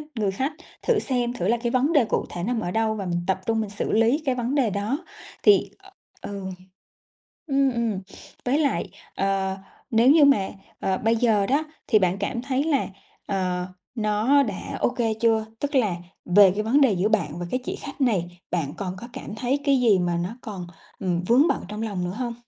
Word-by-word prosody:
người 210 -4 0
khách. 265 +10 -2 0.3
Thử 460 -4 +2
xem 245 -2 -1
thử 180 -6 -2
là 235 - +3
cái 235 0 -2
vấn 270 +5 +2
đề 285 -7 +5
cụ - - -1
thể 175 - -5
nằm 235 +3 0
ở 175 -2 -3
đâu 220 0 +1
và 200 -3 -4
mình 175 -1 -1
tập 190 0 0
trung 225 -1 +1
mình 215 - -4
xử 205 - -3
lý 230 +8 +3
cái 260 -2 +1
vấn 245 +3 -1
đề 265 -6 +3
đó 205 +7 -1 0.5
thì 415 - +5 0.5
ừ. 200 -1 -6 1.0
Ừm, 275 -2 +2
ừm, 230 -4 -1 0.5
với 260 +4 +2
lại, 285 -9 0 0.3
ờ, 195 -1 0 0.3
nếu 235 +3 +5
như 305 -1 +7
mà, 240 -9 +4 0.3
ờ, 190 -1 0
bây 225 +1 +2
giờ 220 -4 +3
đó 285 +4 +1 0.2
thì 215 - +5
bạn 185 0 +1
cảm 235 +4 -2
thấy 270 +1 0
là, 295 -4 +1 0.4
ờ, 180 -2 -1 0.3
nó 220 +5 +3
đã 210 -8 -4
OK 245 - +1 0.3
chưa? 225 -2 +2
Tức 285 0 -3
là 215 -9 +3 0.3
về 195 +1 +7
cái 210 - -1
vấn 245 +7 +3
đề 265 -6 +5
giữa 190 +2 +1
bạn 170 -8 0
và 175 - -4
cái 255 - -1
chị - - -3
khách 275 +1 -9
này, 180 -9 0
bạn 155 -5 -1
còn 185 0 -4
có 235 - -9
cảm 210 - -7
thấy 255 +5 0
cái 275 -3 +3
gì 220 -6 +5
mà 175 -1 0
nó 175 +2 -2
còn, 195 -6 -6 0.3
ừm, 180 -2 -1
vướng 260 - +5
bận - - 0
trong 210 +2 -5
lòng 200 -5 -2
nữa 180 - -3
hông? 240 -2 -2
220 Hz, 210 wpm, -24 LUFS, 190-255 Hz, 1.0 s, như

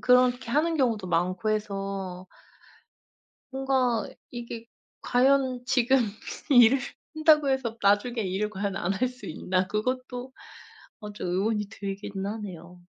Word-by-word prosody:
그렇게 250 -1 +3
하는 320 +5 +2
경우도 230 -8 +1
많고 185 +5 0
해서 195 -3 -3 1.3
뭔가 260 -3 +1 0.2
이게 235 -1 -7 0.4
과연 255 0 +2
지금 250 +1 +3 0.5
일을 245 0 +7 0.3
한다고 310 -2 +4
해서 240 -4 -1
나중에 205 +4 +2
일을 195 +2 -1
과연 200 -1 -3
안 190 0 -1
할 255 +6 +1
수 250 +1 -11
있나 185 +3 -1
그것도 255 +4 -3 0.7
아 210 -1 -6
좀 205 - -5
의문이 210 +3 0
들긴 200 0 -5
하네요. 180 -5 -7
225 Hz, 240 characters per minute, -27 LUFS, 195-255 Hz, 1.3 s, 일을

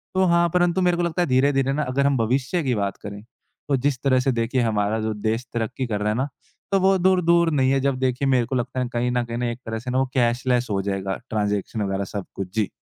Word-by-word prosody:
तो 190 0 +4
हाँ, 170 -1 +3
परंतु 175 +1 +2
मेरे 180 -1 +2
को 175 - 0
लगता 170 +1 -1
है 175 - +1
धीरे-धीरे 135 +1 +2
ना 150 +2 0
अगर 135 +1 0
हम 140 -1 +2
भविष्य 130 +8 0
की 130 -3 0
बात 100 -2 -2
करें 100 0 -7 0.5
तो 140 - +3
जिस 130 -3 -2
तरह 130 -2 +3
से - - +4
देखिए 125 +3 0
हमारा 110 -1 0
जो 110 - -1
देश 115 +3 -1
तरक्की 115 +3 -2
कर 105 -3 -2
रहा 105 - +1
है 105 - 0
ना 130 +3 0 0.4
तो 195 - +3
वो 190 +1 +4
दूर 185 0 +3
दूर 170 0 +4
नहीं 135 -3 +2
है 135 - +2
जब 135 - -2
देखिए 130 +1 0
मेरे 130 -3 +3
को 130 - -3
लगता 125 +1 -2
है 125 - 0
कहीं 120 +1 0
न 125 0 0
कहीं 120 +1 -1
एक 120 - -7
तरह 110 0 -3
से 125 +2 -5
ना 130 - 0
वो 135 - +2
कैशलेस 125 0 +1
हो 100 -1 0
जाएगा। 95 -1 -2
ट्रांज़ेक्शन 105 0 -1
वग़ैरह 95 0 -1
सब 100 -2 -4
कुछ। 95 - -4
जी। 110 -3 +1
125 Hz, 260 wpm, -23 LUFS, 110-140 Hz, 0.5 s, तो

